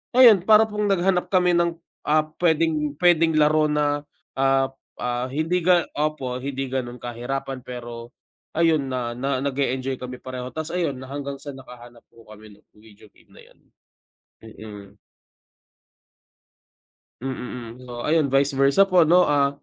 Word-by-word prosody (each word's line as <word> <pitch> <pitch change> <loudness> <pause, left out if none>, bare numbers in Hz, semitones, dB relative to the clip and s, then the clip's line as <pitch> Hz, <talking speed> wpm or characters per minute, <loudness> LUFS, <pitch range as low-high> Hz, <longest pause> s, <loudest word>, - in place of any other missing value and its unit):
ayun 235 -6 +8
para 215 0 +7
pong 210 -1 -2
naghanap 185 -1 +1
kami 180 -2 +3
ng, 170 -1 +1 0.3
ah, 155 +1 +3 0.2
pwedeng 160 -3 +1
pwedeng 165 -1 +3
laro 155 0 +3
na 145 -1 -1 0.3
ah 135 0 +2 0.2
ah, 125 +1 -3
hindi 160 +6 -1
ga 175 0 +3 0.2
opo 135 -5 -2
hindi 135 -1 -4
ganon 125 -2 -3
kahirapan 130 +2 -5
pero, 120 -1 -9 0.4
ayun 160 -4 +2
na 125 -2 -3
na 135 0 -2
nag-e-enjoy 135 -1 -2
kami 125 0 -7
pareho 130 -1 -6
tas 160 +1 -4
ayun 170 -6 -1
na 130 +1 -10
hanggang 140 -1 -5
sa 145 - -8
nakahanap 120 -3 -13
po 115 - -19
kami 110 0 -13
ng - - -26 0.2
video 105 -1 -18
game - - -26
na - - -15
yun, - - -22 0.8
mm. 110 -2 -11 2.4
Mm, 135 0 -3 0.5
mm 125 - -13
oh 120 0 -6
ayun 155 -2 +2
vice 135 +2 +2
versa 135 +8 +4
po 185 -2 +4
ano 175 +3 +5
ah, 140 -1 +2
140 Hz, 150 wpm, -23 LUFS, 125-160 Hz, 2.4 s, ayun